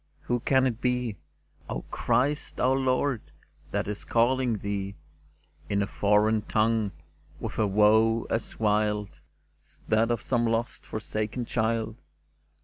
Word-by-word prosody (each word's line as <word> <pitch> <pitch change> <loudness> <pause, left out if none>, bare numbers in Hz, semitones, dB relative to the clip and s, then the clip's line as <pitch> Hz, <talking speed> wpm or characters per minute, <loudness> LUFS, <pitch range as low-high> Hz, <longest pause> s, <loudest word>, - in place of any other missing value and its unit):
" - - -39
Who 120 0 +1
can 130 +2 +3
it 120 -2 -1
be, 125 -4 0 0.5
O - - -3
Christ 145 +4 0
our 130 +1 +3
Lord, 130 -2 +1 0.5
that - - -1
is 105 0 -4
calling 120 0 +2
Thee 100 -1 -3 0.7
In 100 0 +1
a - - 0
foreign 105 +2 +2
tongue, 110 -1 +1 0.5
with - - -5
a 110 - +3
woe 110 +3 +4
as 115 -1 -3
wild 105 -6 0 0.4
As - - -18
that 110 +1 +3
of 120 -3 -1
some 120 -2 +1
lost, 115 +1 -2
forsaken 110 +2 -3
child 110 -1 -1
110 Hz, 140 wpm, -27 LUFS, 105-120 Hz, 0.7 s, woe